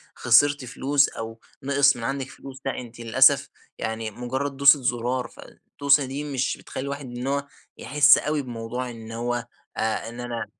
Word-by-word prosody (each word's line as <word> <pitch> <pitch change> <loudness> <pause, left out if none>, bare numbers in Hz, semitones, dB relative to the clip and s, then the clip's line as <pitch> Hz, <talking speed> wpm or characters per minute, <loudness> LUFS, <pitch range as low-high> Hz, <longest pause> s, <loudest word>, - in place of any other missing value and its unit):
خسرتِ 140 +3 +4
فلوس 140 +3 +1
أو 115 0 -7 0.2
نقِص 140 +1 +4
من 115 - -7
عندِك 135 +2 -3
فلوس، 135 -1 -11
لأ، 135 - -2
أنتِ 120 -1 -11
للأسف 115 -1 +4 0.3
يعني 110 0 -4
مجرد 130 +5 -4
دوسة 140 +1 +6
زرار 125 0 -1
فالدوسة 140 0 0
دي 135 +3 -5
مش 135 -3 -2
بتخلي - - -7
الواحد 140 0 -5
إن 125 +1 -6
هو 140 +1 -1 0.3
يحس 145 +3 +5
أوي 150 0 -1
بموضوع 125 0 -5
إن 115 -1 -10
هو 120 +1 -3 0.3
آآ، 110 0 -1
إن 120 +1 -10
أنا 120 -1 -4
130 Hz, 165 wpm, -24 LUFS, 120-140 Hz, 0.3 s, دوسة